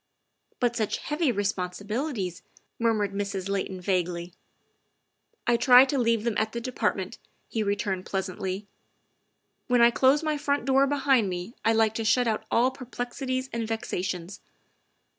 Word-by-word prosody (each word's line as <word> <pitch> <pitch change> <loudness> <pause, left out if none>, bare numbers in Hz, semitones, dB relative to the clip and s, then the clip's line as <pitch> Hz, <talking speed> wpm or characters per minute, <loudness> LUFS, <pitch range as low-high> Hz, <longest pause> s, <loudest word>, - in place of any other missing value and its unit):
" - - -44
But 240 -1 +1
such 220 -3 -1
heavy 300 -2 0
responsibilities," 200 - -2 0.4
murmured 215 -4 +1
Mrs. 200 -1 -3
Layton 190 -1 -2
vaguely. 180 -2 -1 0.3
' - - -47
' - - -46
I 240 0 +3
try 250 +2 +8
to 275 0 -1
leave 230 -2 +2
them 235 -1 0
at 220 0 -1
the 235 - -2
Department, 225 -4 -2
' - - -42
' - - -44
he 225 - 0
returned 200 -2 -1
pleasantly. 190 +1 -3 0.5
" - - -48
When 245 -2 +4
I 235 - +7
close 270 +5 +3
my 305 -2 0
front 285 -3 0
door 270 +1 +4
behind 270 -6 +2
me 180 +5 -5
I 225 - +3
like 220 -1 +3
to 225 - -2
shut 245 +3 +3
out 220 -1 -1
all 250 +3 +3
perplexities 255 +1 -4
and 230 -1 -2
vexations. 190 -4 -4
225 Hz, 165 wpm, -27 LUFS, 195-250 Hz, 0.5 s, try